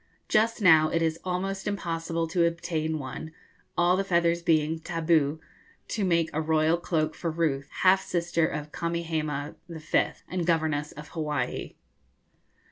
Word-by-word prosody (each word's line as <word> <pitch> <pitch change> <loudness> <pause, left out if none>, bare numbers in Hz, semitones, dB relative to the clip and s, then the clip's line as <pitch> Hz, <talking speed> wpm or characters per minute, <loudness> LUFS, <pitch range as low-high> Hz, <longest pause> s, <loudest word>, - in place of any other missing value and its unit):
Just 225 0 +2
now 160 -3 +7
it 165 +1 +1
is 160 0 0
almost 190 +2 -2
impossible 165 -4 -2
to 170 -1 +3
obtain 160 -1 -2
one, 150 +3 -6 0.5
all 175 +1 +4
the 195 - +1
feathers 170 -2 +2
being 160 -1 +2
'tabu,' 160 -3 +1 0.5
to 215 - -1
make 170 -3 +2
a 155 - 0
royal 160 +1 +2
cloak 155 -2 -1
for 170 - -3
Ruth, 155 -4 -1
half 190 +1 +6
sister 170 -2 0
of 150 0 -5
Kamehameha 160 -4 -2 0.2
V., 160 -2 0 0.2
and 180 -2 -2
governess 155 -3 +1
of 150 +1 -10
Hawaii. 150 -6 -3
165 Hz, 140 wpm, -27 LUFS, 155-175 Hz, 0.5 s, now